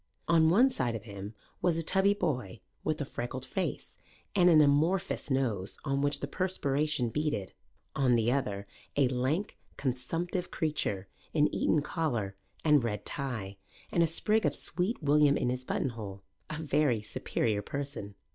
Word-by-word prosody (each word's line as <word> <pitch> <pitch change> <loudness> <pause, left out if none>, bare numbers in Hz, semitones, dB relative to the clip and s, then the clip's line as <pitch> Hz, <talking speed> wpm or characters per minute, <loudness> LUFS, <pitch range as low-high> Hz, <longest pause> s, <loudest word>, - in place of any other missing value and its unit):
On 160 -2 +5
one 245 +10 +5
side 120 - -1
of 110 - -5
him 100 0 -8 0.3
was 175 -2 +2
a 165 - 0
tubby 195 +4 +3
boy 125 - -2 0.2
with 155 -1 0
a - - -1
freckled 130 +1 -5
face 185 +8 -3 0.4
and 180 -2 +6
an 160 -3 +7
amorphous 155 +6 +2
nose 115 -8 0
on 140 -1 +1
which 145 0 +1
the 140 - -2
perspiration 150 -6 0
beaded; 150 -8 -2 0.4
on 130 -3 +4
the 115 +1 +2
other 105 -7 -1 0.3
a 140 -3 +4
lank, 135 +10 -1 0.2
consumptive 165 +8 -2
creature, 105 - -1 0.3
in 150 -1 +3
Eton 150 -2 +2
collar 120 - -1 0.3
and 150 -4 +5
red 105 -3 -2
tie 110 -9 -3 0.3
and 170 - +2
a 165 - +5
sprig 210 +7 +2
of 145 -3 +1
sweet 180 +3 -2
William 145 0 +5
in - - 0
his 125 0 -3
buttonhole, 105 -9 -3 0.3
a 155 - -4
very 140 -7 +2
superior 105 0 -1
person. 135 -4 -5
140 Hz, 155 wpm, -31 LUFS, 120-160 Hz, 0.4 s, an